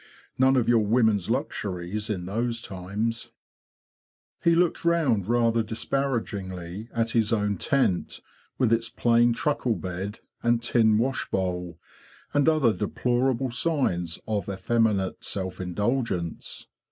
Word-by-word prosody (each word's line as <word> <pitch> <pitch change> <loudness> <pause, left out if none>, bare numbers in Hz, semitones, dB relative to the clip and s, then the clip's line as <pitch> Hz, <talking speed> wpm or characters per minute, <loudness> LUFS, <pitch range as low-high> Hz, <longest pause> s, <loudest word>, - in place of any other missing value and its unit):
None 130 +1 +5
of 125 -3 +2
your 115 -2 +4
women's 110 -3 +2
luxuries 105 - -2
in 90 -4 -2
those 115 +4 -1
times!'' 105 +3 -4 1.1
He 170 0 +5
looked 175 0 +2
round 150 - +2
rather 115 -1 +3
disparagingly 110 -5 -3
at 115 -1 0
his 110 -2 +2
own 105 -3 +1
tent, 115 -5 0 0.4
with 120 -4 +3
its 115 0 +1
plain 120 0 +3
truckle 125 -2 0
bed, 95 +3 -5 0.2
and 120 0 +2
tin 115 -2 +3
wash 130 +4 -1
bowl, 90 -3 -2 0.5
and 145 +1 +4
other 145 -8 +3
deplorable 125 +4 0
signs 120 - 0
of 105 -3 -2
effeminate 100 0 0
self 95 -2 -4
indulgence. 95 -1 -2
115 Hz, 120 wpm, -26 LUFS, 95-120 Hz, 1.1 s, None